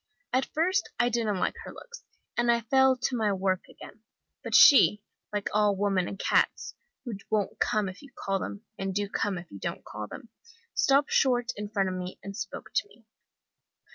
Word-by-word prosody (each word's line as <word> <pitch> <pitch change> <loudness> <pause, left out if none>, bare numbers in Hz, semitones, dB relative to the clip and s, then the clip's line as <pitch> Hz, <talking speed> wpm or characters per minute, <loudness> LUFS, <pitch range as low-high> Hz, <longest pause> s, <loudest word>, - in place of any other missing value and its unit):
At 260 +1 +2
first 365 +6 0
I 240 0 +3
didn't 225 -4 0
like - - 0
her - - -8
looks, - - -12 0.3
and 240 0 +3
I 235 0 +2
fell 265 +3 +4
to 255 0 -1
my 220 -3 +1
work 190 -1 0
again. 215 - -13 0.4
But - - -1
she, 210 -8 +7 0.3
like 205 -1 -2
all 210 -1 +3
women 195 -2 +1
and 195 - -6
cats, - - +1 0.3
who 240 - -4 0.2
won't 210 -3 -1
come 210 -2 +1
if 185 0 -8
you 280 -1 -14
call 195 0 -2
them, 205 +3 -6
and 195 -1 -3
do 205 0 0
come 200 -1 -1
if 175 0 -10
you 100 - -9
don't - - -5
call 105 0 -6
them, 230 - -10 0.4
stopped 285 -10 +3
short 250 -2 +2
in 210 0 -5
front 200 -2 0
of - - -3
me, 180 0 -5
and 200 0 -7
spoke 195 -2 -7
to - - +1
me. 235 - -22
210 Hz, 200 wpm, -28 LUFS, 195-255 Hz, 0.4 s, she